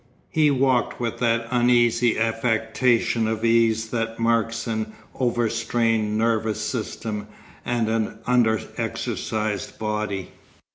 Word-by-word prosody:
He 155 -2 +4
walked 130 -3 +1
with 120 -2 -3
that 115 -1 +1
uneasy 120 -1 +3
affectation 115 +1 +1
of 110 +1 -1
ease 115 -1 +2
that 115 -1 -2
marks 115 0 +1
an 110 -2 -3 0.2
overstrained 115 -2 0
nervous 110 -1 +1
system 110 -1 -4 0.4
and 120 -2 0
an 110 -1 -1
under 120 -3 +3 0.2
exercised 110 -3 -3
body. 105 -3 -3
115 Hz, 105 wpm, -24 LUFS, 110-120 Hz, 0.4 s, He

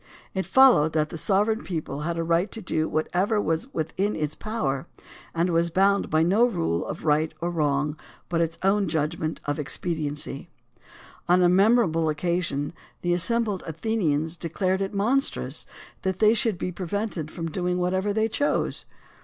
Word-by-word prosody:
It 190 -1 -2
followed 245 - +6
that 155 -1 +1
the - - -7
sovereign 210 +7 +1
people 155 -5 -4
had 165 +3 -2
a 165 - 0
right 170 +4 +1
to 225 - -4
do 160 -5 -1
what 155 +1 0
ever 205 +4 +2
was 165 - -1
within 185 - -1
its 150 -1 -2
power, 160 -10 -3 0.5
and 170 +2 +1
was 170 0 +2
bound 195 +3 +2
by 155 +1 +3
no 195 +7 +3
rule 170 - 0
of 160 - -6
right 155 +1 +2
or 175 +1 -2
wrong 150 -2 0 0.3
but 170 -1 0
its 165 0 -1
own 195 +1 +2
judgment 160 0 -2
of 145 +1 -2
expediency. 150 0 -3 0.8
On 180 +1 +5
a 175 - +5
memorable 185 -4 +3
occasion 155 -2 -1 0.3
the 175 0 +2
assembled 205 +3 +1
Athenians 160 -3 -1
declared 185 +3 -1
it 195 - -2
monstrous 235 +8 +1 0.3
that 190 -1 -1
they 215 +2 +5
should 225 -3 +1
be 180 - -3
prevented 185 -2 -3
from 165 0 -5
doing 180 +1 -1
whatever 185 +3 0
they 220 +2 +1
chose. 290 +6 0
175 Hz, 165 wpm, -25 LUFS, 160-200 Hz, 0.8 s, followed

